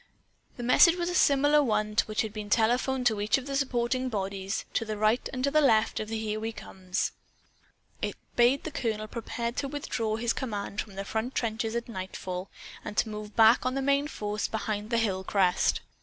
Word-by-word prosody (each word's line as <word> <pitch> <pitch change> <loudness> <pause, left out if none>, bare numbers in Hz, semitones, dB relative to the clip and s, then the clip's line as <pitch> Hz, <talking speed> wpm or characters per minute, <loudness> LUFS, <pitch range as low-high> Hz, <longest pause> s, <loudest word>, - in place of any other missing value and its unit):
The 245 - -5
message 290 +8 +6
was 355 0 -2
similar 290 -1 +4
to - - +4
one 215 -3 0
which 215 0 0
had 215 -2 -5
been 210 -1 -6
telephoned 245 +4 +2
to 220 -3 +2
each 210 +5 +2
of 265 - -6
the 275 -1 -3
supporting 255 -1 0
bodies, 195 -2 -3
to - - +1
right 215 +3 +2
and 255 -1 -4
to 280 - +2
left 245 -8 +3
of 215 - -4
the 225 +1 -3
Here 215 -1 -2
We 225 +1 -3
Comes. 185 -4 -3 0.9
It - - -2 0.2
bade 245 +3 +4
the 315 - -5
colonel 220 -5 -2
prepare 235 +1 -4
to 275 +3 -3
withdraw 245 -6 -2
his 230 +1 0
command 210 -4 -3
from 205 -3 -11
the 195 0 -4
front 225 +5 -3
trenches 225 -1 -1
at 235 - -2
nightfall, 185 -3 -5 0.3
and 210 - -7
to 225 - +2
move 210 0 -7
back 225 +1 +6
on 255 +1 -1
the 275 - 0
main 280 +1 +2
force 210 -6 -3
behind 215 -1 -3
the 235 - +1
hill 195 -5 0
crest. 190 -2 +2
225 Hz, 200 wpm, -28 LUFS, 210-255 Hz, 0.9 s, message